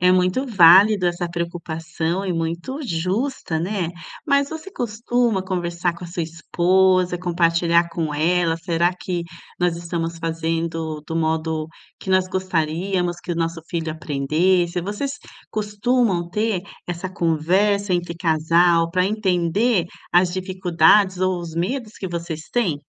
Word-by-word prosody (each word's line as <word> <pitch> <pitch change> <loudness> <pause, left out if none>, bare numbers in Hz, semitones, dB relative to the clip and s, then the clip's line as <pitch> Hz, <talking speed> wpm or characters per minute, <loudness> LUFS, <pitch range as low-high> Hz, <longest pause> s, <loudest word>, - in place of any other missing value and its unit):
é 180 +1 +5
muito 185 +8 +2
válido 195 -1 +6
essa 175 0 -1
preocupação 170 +1 -3
e 185 - -1
muito 170 - -3
justa, 185 - -2
né, 180 -1 -2 0.4
mas 280 -1 +3
você 320 +5 -8
costuma 235 - 0
conversar 175 -2 -2
com 170 - -9
a - - -6
sua 170 0 -4
esposa, 180 +2 +2
compartilhar 170 -1 +2
com 160 -3 -2
ela, 165 +2 +2
"será 170 +1 0
que 175 -2 -3 0.4
nós 175 -1 +1
estamos 170 -1 -3
fazendo 165 -1 -2
do 165 - -5
modo 160 -1 -1 0.3
que - - -10
nós 185 -1 +3
gostaríamos 180 0 -1
que 175 - -4
o - - -2
nosso 165 0 -2
filho 165 -2 -2
aprendesse?" 170 +4 +1
Vocês 210 +10 -4 0.3
costumam 210 -3 0
ter 210 -1 0 0.2
essa 175 +1 -4
conversa 185 +4 +1
entre 175 -1 -1
casal 165 +1 +3
pra 180 +1 +2
entender 195 0 +1 0.3
as 175 0 +3
dificuldades, 185 0 +3
ou 185 -1 +1
os 170 -2 -7
medos 215 +6 -3
que 190 - -4
vocês 170 -2 -5
têm? 190 -12 0
175 Hz, 135 wpm, -22 LUFS, 165-190 Hz, 0.4 s, válido